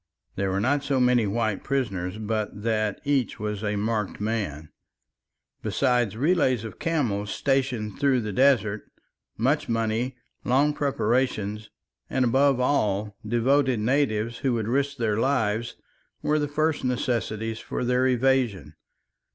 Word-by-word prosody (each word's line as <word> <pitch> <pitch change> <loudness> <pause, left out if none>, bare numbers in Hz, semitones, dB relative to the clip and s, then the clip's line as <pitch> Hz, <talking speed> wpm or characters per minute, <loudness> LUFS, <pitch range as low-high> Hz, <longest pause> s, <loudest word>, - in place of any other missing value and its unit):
There 95 0 -1
were 95 +1 0
not 140 +7 +1
so 140 -2 0
many 125 -3 +3
white 110 -1 -1
prisoners 100 -9 -2
but 110 -1 -3
that 110 -3 0
each 140 -6 0
was 105 0 -3
a 105 0 -1
marked 105 -1 -2
man. 100 -9 -3 0.9
Besides 120 -6 +1
relays 135 - +2
of 110 - -8
camels 115 -12 -1
stationed 130 -6 -1
through 135 -3 +3
the 105 -2 -4
desert, 110 -5 +2 0.5
much 135 +6 +1
money, 115 +3 -1 0.3
long 140 +4 +3
preparations, 110 -6 -1 0.4
and 130 -1 +1
above 135 +2 +3
all, 105 -6 0
devoted 125 +3 +2
natives 115 -2 0
who 130 -2 0
would 110 -2 -1
risk 140 +3 0
their 110 -4 0
lives, 115 -3 0 0.5
were 150 0 +2
the 145 - 0
first 155 +1 0
necessities 115 -3 -1
for 125 - -4
their 125 +1 +2
evasion. 130 -5 +1
120 Hz, 135 wpm, -25 LUFS, 105-135 Hz, 0.9 s, many